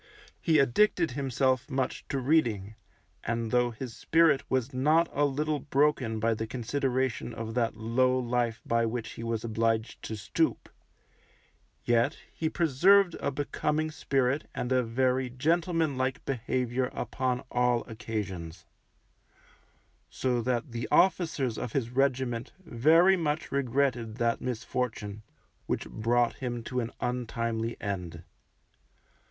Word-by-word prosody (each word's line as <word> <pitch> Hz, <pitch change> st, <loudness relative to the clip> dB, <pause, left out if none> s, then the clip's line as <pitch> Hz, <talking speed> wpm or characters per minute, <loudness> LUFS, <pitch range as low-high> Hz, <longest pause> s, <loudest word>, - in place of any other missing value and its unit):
He 160 Hz, -2 st, +3 dB
addicted 165 Hz, -, +3 dB
himself 130 Hz, -1 st, 0 dB
much 130 Hz, -1 st, -2 dB
to 140 Hz, -, -2 dB
reading, 120 Hz, -8 st, +1 dB, 0.5 s
and 115 Hz, -1 st, -2 dB
though 125 Hz, 0 st, +3 dB
his 120 Hz, 0 st, -7 dB
spirit 160 Hz, -4 st, +3 dB
was 130 Hz, 0 st, 0 dB
not 155 Hz, +6 st, +3 dB
a 145 Hz, +1 st, +2 dB
little 150 Hz, +2 st, -1 dB
broken 135 Hz, -5 st, +1 dB
by 115 Hz, +1 st, +2 dB
the 110 Hz, 0 st, -4 dB
consideration 130 Hz, 0 st, -1 dB
of 115 Hz, 0 st, -5 dB
that 115 Hz, -2 st, 0 dB
low 125 Hz, +3 st, +2 dB
life 120 Hz, -2 st, -1 dB
by 115 Hz, 0 st, +2 dB
which 115 Hz, 0 st, -4 dB
he -, -, -9 dB
was 115 Hz, -1 st, -2 dB
obliged 115 Hz, 0 st, -1 dB
to 110 Hz, -, -5 dB
stoop, 105 Hz, -1 st, -1 dB, 1.2 s
yet 120 Hz, 0 st, +2 dB, 0.2 s
he 160 Hz, -, -1 dB
preserved 175 Hz, +5 st, +4 dB
a -, -, -1 dB
becoming 150 Hz, +2 st, -1 dB
spirit 135 Hz, -1 st, 0 dB
and 125 Hz, -, -3 dB
a 130 Hz, 0 st, +4 dB
very 125 Hz, +2 st, 0 dB
gentleman 160 Hz, +2 st, 0 dB
like 130 Hz, +1 st, -1 dB
behaviour 125 Hz, 0 st, -1 dB
upon 130 Hz, -1 st, -2 dB
all 125 Hz, -1 st, +2 dB
occasions; 105 Hz, -7 st, -5 dB, 1.4 s
so 125 Hz, -2 st, 0 dB
that 125 Hz, +2 st, -1 dB
the 115 Hz, 0 st, -4 dB
officers 155 Hz, -8 st, +2 dB
of 120 Hz, -, -5 dB
his 120 Hz, -4 st, -1 dB
regiment 130 Hz, -3 st, 0 dB
very 165 Hz, +10 st, +5 dB
much 155 Hz, -3 st, -2 dB
regretted 130 Hz, -4 st, 0 dB
that 115 Hz, -1 st, 0 dB
misfortune 115 Hz, -4 st, -3 dB, 0.5 s
which -, -, -2 dB
brought 120 Hz, +2 st, +1 dB
him 120 Hz, -2 st, -4 dB
to 125 Hz, +2 st, -3 dB
an 115 Hz, -2 st, -2 dB
untimely 115 Hz, -2 st, -2 dB
end. 90 Hz, -5 st, -4 dB
125 Hz, 130 wpm, -29 LUFS, 115-140 Hz, 1.4 s, very